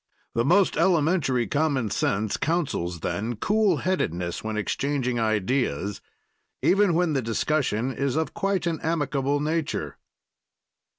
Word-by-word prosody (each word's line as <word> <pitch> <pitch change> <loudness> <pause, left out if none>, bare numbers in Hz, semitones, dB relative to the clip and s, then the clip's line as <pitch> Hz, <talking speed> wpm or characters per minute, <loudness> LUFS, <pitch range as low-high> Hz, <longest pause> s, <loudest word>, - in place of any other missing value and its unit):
The 115 - +1
most 180 +7 +3
elementary 160 -7 +2
common 140 -3 0
sense 105 +1 0
counsels 135 - -1
then 115 +7 -2
cool 200 - +2
headedness 90 - -1
when 110 0 -3
exchanging 125 +2 -1
ideas, 105 - 0 0.6
even 195 -3 +4
when 175 -2 +2
the 135 - +1
discussion 125 +1 0
is 135 +1 -1
of 160 0 -1
quite 195 -3 -1
an 165 -2 -1
amicable 145 -3 0
nature. 155 +1 -2
140 Hz, 120 wpm, -25 LUFS, 110-165 Hz, 0.6 s, even